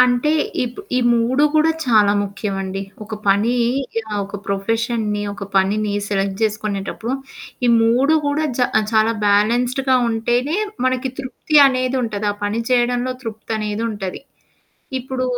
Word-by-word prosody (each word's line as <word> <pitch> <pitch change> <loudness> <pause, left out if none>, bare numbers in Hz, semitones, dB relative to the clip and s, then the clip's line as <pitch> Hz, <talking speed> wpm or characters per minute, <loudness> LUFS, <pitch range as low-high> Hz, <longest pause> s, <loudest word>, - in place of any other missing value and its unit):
అంటే 250 +4 +3 0.3
ఇప్ 245 0 -5 0.2
ఈ - - +4 0.2
3 250 +5 +2
కూడా 310 +1 +4 0.2
చాలా 210 -4 +5
ముఖ్యమండి. 195 -1 -4 0.2
ఒక 215 +1 -6
పని 205 +5 +3 0.6
ఆహ్, 205 - -1
ఒక 200 - -7
ప్రొఫెషన్‌ని, 215 +1 -1
ఒక 200 0 -6
పనిని, 205 +2 +2 0.2
సెలెక్ట్ 195 -1 -1
జేసుకునేటప్పుడు. 215 +2 -2 0.5
ఈ - - +3
3 250 +7 +3
కూడా 295 +2 0
జ - - +1 0.3
చాలా 220 +1 +3
బ్యాలెన్స్‌డ్‌గా 245 +6 +2
ఉంటేనే. 240 +7 0 0.3
మనకి 255 0 0
తృప్తి 275 +3 -2
అనేది 255 -1 0
ఉంటది. 210 -3 -3
ఆ - - -10
పని 210 +3 -1
చేయడంలో 245 0 +2
తృప్తనేది 220 -1 -3
ఉంటది. 195 -3 -5 0.8
ఇప్పుడు 255 0 -3
225 Hz, 130 wpm, -20 LUFS, 205-255 Hz, 0.8 s, చాలా